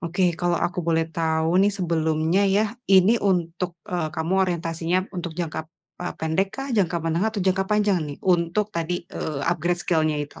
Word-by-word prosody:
Oke, 175 +1 +1
kalau 175 -1 +2
aku 180 +3 -2
boleh 165 -1 +1
tahu 160 +2 +1
nih 200 - +5
sebelumnya 160 +1 +1
ya, 205 +3 +3 0.2
ini 190 +3 +6
untuk, 175 -2 -1
eee, 175 -3 -2
kamu 160 +3 -1 0.2
orientasinya 170 +1 -1
untuk 170 -3 -5
jangka, 160 -2 -4 0.3
eee, 180 - -4
pendekkah, 195 - -2
jangka 185 -6 +2
menengah 170 +6 +1
atau 205 -4 -3
jangka 190 0 +2
panjang 210 -3 +2
nih? 145 - -6
Untuk 185 +4 +1
tadi, 170 +1 -2
eee, 150 -3 -4
upgrade 175 +1 0
skill-nya 155 -3 +1
itu. 145 - -15
175 Hz, 165 wpm, -24 LUFS, 165-190 Hz, 0.3 s, ini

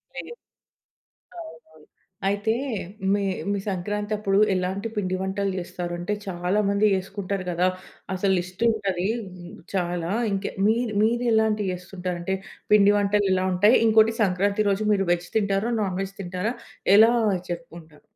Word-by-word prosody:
లేదు. - - -7 1.1
అవునవును. 230 - -13 0.4
అయితే, 205 +3 0 0.6
మీ 205 0 +1 0.3
మీ 200 - 0
సంక్రాంతప్పుడు 205 +1 -1 0.2
ఎలాంటి 190 +3 -2
పిండి 185 -3 -1
వంటలు 195 +1 -1
చేస్తారు? 175 0 -5
అంటే, 175 +4 -2
చాలా 180 +2 0
మంది 200 +1 +1
యేసుకుంటారు 195 0 -4
గదా! 175 +1 +2 0.5
అసలు 190 +1 +1
లిస్టుంటదీ 195 0 -1 0.2
హ్మ్, 180 -2 -11 0.2
చాలా. 175 -1 -1 0.2
ఇంక 195 0 -2 0.2
మీరు 225 0 +1
మీరు 240 +2 +1
ఎలాంటియ్యేస్తుంటారు. 190 -4 -1
అంటే, 190 +2 -1 0.4
పిండి 205 -1 +6
వంటలు 205 0 +2
ఎలా 185 0 0
ఉంటయి? 205 +7 +5
ఇంకోటి 220 0 +5
సంక్రాంతి 200 +2 +1
రోజు 200 +2 0
మీరు 195 -2 +1
వెజ్ 175 0 -2
తింటారా? 200 +2 +1
నాన్ 190 -3 -1
వెజ్ 195 0 -6
తింటారా? 185 +5 -3 0.4
ఎలా 225 +3 +7 0.4
చెప్పుకుంటారు? 165 -3 -8
195 Hz, 130 wpm, -24 LUFS, 180-210 Hz, 1.1 s, ఎలా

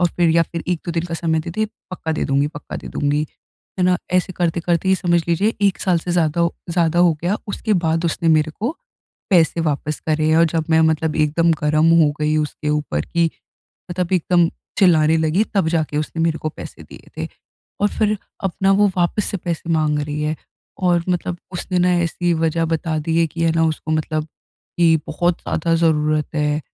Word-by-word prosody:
और 175 - +4
फिर 175 -1 +3
या 165 +1 +4
फिर 165 +1 -5
1-2 175 -1 -2
दिन 165 - -1
का 170 -1 -4
समय 160 -1 0
दे, 155 - -6
दे, 215 +5 -1 0.2
पक्का 160 -3 -3
दे 155 - -1
दूँगी 140 0 +1
पक्का 145 -1 -8
दे - - -8
दूँगी। 145 +1 0 0.5
है 180 - +2
ना, 180 0 +3 0.2
ऐसे 185 0 +1
करते-करते 170 +1 0
ही 190 - +5
समझ 175 -3 +1
लीजिए 200 +7 +1
1 200 -2 +2
साल 180 -3 +2
से 175 - -5
ज़्यादा 170 -2 +1
हो 170 0 +1 0.2
ज़्यादा 170 -1 +1
हो 175 -1 +5
गया, 180 +4 +1
उसके 215 +2 -2
बाद 165 +1 +1
उसने 165 0 0
मेरे 155 -1 +3
को, 230 - -3 0.6
पैसे 170 -2 +3
वापस 155 -1 -2
करे 155 0 +2
और 165 - +6
जब 165 -2 0
मैं 160 - +5
मतलब 160 0 +1
एकदम 155 +2 +2
गरम 155 +2 +3
हो 150 - +3
गई 150 0 +1
उसके 150 0 -2
ऊपर, 150 - -1
कि 170 -1 +1 0.6
मतलब 180 0 -2
एकदम 175 -1 +3 0.3
चिल्लाने 160 -5 +4
लगी, 160 +6 +2
तब 190 -5 +2
जाके 155 -3 -1
उसने 165 +2 -2
मेरे 165 -1 +1
को 155 - -3
पैसे - - -10
दिए - - -15
थे - - -3 0.5
और 205 - +3
फिर 215 -1 +2 0.3
अपना 195 +1 +1
वो 205 0 +5
वापस 180 +4 +1
से - - 0
पैसे 170 -2 -4
माँग 155 -2 +1
रही 150 0 -3
है। 155 +1 -1 0.4
और 175 -2 +2
मतलब 180 0 -1 0.2
उसने 180 +1 -2
ना 180 +1 +3
ऐसी 175 +1 0
वज़ह 165 +1 0
बता 160 -1 -1
दी 160 +2 0
है 165 - +3
कि 165 +2 -5
है 165 - +3
ना 165 - +3
उसको 155 0 -3
मतलब, 155 0 -1 0.5
कि 165 -2 +5
बहुत 170 +2 0
ज़्यादा 165 +1 0
ज़रूरत 155 -2 +1
है। 150 0 0
165 Hz, 205 wpm, -20 LUFS, 155-175 Hz, 0.6 s, और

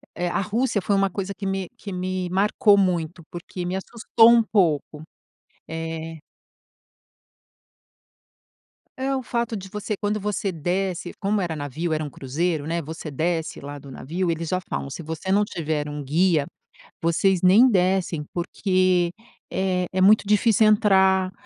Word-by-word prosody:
eh, 175 - -2
a - - 0
Rússia 220 +2 0
foi 200 +2 +1
uma 195 0 +2
coisa 195 +1 -4
que 200 - -6
me 195 -1 -2
que 205 - -8
me 185 0 -3
marcou 205 +3 +3
muito, 175 -3 0
porque 175 +1 -6
me 180 +1 -2
assustou 225 +3 +3
um 235 -1 +5
pouco. 160 -7 0 0.6
Eh 160 0 -5 2.8
É, 270 +1 -1
o 260 - -3
fato 235 -1 -2
de 190 -2 -7
você, 210 +1 -4
quando 210 +1 -1
você 205 -1 -2
desce, 180 +2 -2
como 205 +1 +1
era 170 -3 -2
navio 155 +3 -3
era 155 0 -1
um 150 - -5
cruzeiro, 150 +4 -2
né, 170 +1 -1
você 160 +1 -7
desce 160 +3 -2
lá 145 +1 -7
do 140 - -13
navio 170 +8 -3
eles 165 0 -3
já 185 - 0
falam: 140 - -3
"Se 140 - -7
você 160 +4 -4
não 205 +2 +3
tiver 155 -5 -3
um 145 0 -5
guia, 160 +1 +2 0.6
vocês 170 +2 +2
nem 205 +8 +6
descem 185 -5 +1
porque 185 0 +1 0.4
é 185 -1 0
é 185 - +1
muito 210 +3 +6
difícil 215 +1 +4
entrar. 190 -3 +4
185 Hz, 155 wpm, -23 LUFS, 165-200 Hz, 2.8 s, nem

